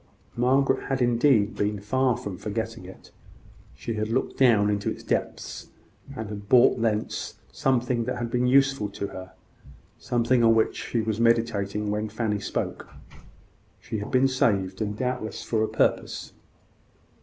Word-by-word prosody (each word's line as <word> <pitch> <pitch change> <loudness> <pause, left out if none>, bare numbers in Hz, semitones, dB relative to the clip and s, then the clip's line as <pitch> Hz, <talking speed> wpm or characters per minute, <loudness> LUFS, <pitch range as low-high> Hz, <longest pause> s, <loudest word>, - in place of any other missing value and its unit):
Margaret 135 +2 +2
had 135 -1 0
indeed 120 -3 +3
been 105 0 -1
far 125 +4 +1
from 100 -2 -6
forgetting 110 +1 -4
it. 95 - -13 0.6
She 115 - -5
had 110 0 -2
looked 125 +3 -1
down 115 -6 +5
into 100 -1 -1
its - - -6
depths, - - -3 0.5
and 110 -3 -5
had 100 -1 -8
brought 125 -1 +5
thence 110 -2 -1 0.2
something 125 -2 0
that 125 +1 -3
had 120 -1 -4
been 125 +1 +1
useful 135 -4 +3
to 100 0 -5
her 95 0 -9 0.7
something 120 0 +1
on 115 0 +5
which 110 - +2
she 115 - 0
was 110 0 -2
meditating 105 -3 +1
when 105 +1 -2
Fanny 110 -1 -1
spoke. - - -4 0.9
She 110 - -5
had 105 - -6
been 130 +1 +4
saved, 100 -7 0
and 105 -1 -2
doubtless 125 -3 -3
for 110 -2 0
a - - +1
purpose. - - -1
115 Hz, 155 wpm, -26 LUFS, 105-125 Hz, 0.9 s, down